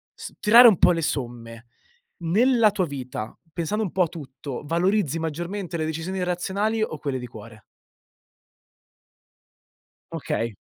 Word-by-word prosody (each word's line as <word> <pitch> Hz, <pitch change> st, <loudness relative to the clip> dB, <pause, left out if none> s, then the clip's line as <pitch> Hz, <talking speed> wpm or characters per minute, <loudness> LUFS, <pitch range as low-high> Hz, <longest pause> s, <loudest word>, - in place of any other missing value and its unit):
s -, -, -9 dB
tirare 235 Hz, +4 st, +8 dB
un 215 Hz, -6 st, +6 dB
po' -, -, +5 dB
le 165 Hz, -1 st, 0 dB
somme, 120 Hz, -5 st, -4 dB, 0.5 s
nella 220 Hz, +7 st, +3 dB
tua 195 Hz, -3 st, -1 dB
vita, 130 Hz, -6 st, -6 dB, 0.2 s
pensando 185 Hz, +7 st, -2 dB
un 190 Hz, -, -3 dB
po' 190 Hz, -, +2 dB
a -, -, 0 dB
tutto, 140 Hz, -4 st, -8 dB
valorizzi 170 Hz, 0 st, +1 dB
maggiormente 170 Hz, +3 st, -4 dB
le 155 Hz, -, -1 dB
decisioni 170 Hz, +4 st, -3 dB
razionali 200 Hz, +5 st, -1 dB
o 155 Hz, -8 st, -4 dB
quelle 140 Hz, -3 st, -2 dB
di 125 Hz, -1 st, -6 dB
cuore? 110 Hz, -1 st, -13 dB, 2.5 s
Okay. 115 Hz, -2 st, -3 dB
165 Hz, 135 wpm, -24 LUFS, 130-195 Hz, 2.5 s, tirare